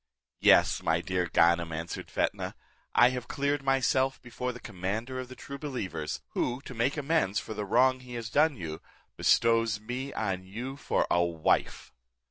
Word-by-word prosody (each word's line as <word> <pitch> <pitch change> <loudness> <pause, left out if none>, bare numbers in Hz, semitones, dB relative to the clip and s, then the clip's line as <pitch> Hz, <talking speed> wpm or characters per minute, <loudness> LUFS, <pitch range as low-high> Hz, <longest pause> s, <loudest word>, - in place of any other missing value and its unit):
"Yes, - - +5
my 80 0 +2
dear 90 0 -1
Ganem," 85 0 +3
answered 80 +1 -5
Fetnah, - - -1 0.4
"I 120 - +7
have 125 -1 -5
cleared 140 +1 0
myself 135 0 +2
before 125 +1 -4
the 125 - -10
commander 110 +6 -4
of 130 - -5
the 130 - -10
true 140 +1 -8
believers, 110 - -4
who, 125 +1 -1
to 135 - -9
make 125 +6 0
amends 145 - +1
for 110 - -7
the 105 -1 -4
wrong 130 +5 +3
he 125 -1 -9
has 115 -1 -5
done 150 +2 +4
you, 80 -4 -6 0.3
bestows 115 -1 +3
me 125 +5 -5
on 95 -4 -2
you 120 +8 -6
for 145 - 0
a 85 - +4
wife." 85 -2 0
115 Hz, 170 wpm, -29 LUFS, 95-130 Hz, 0.4 s, I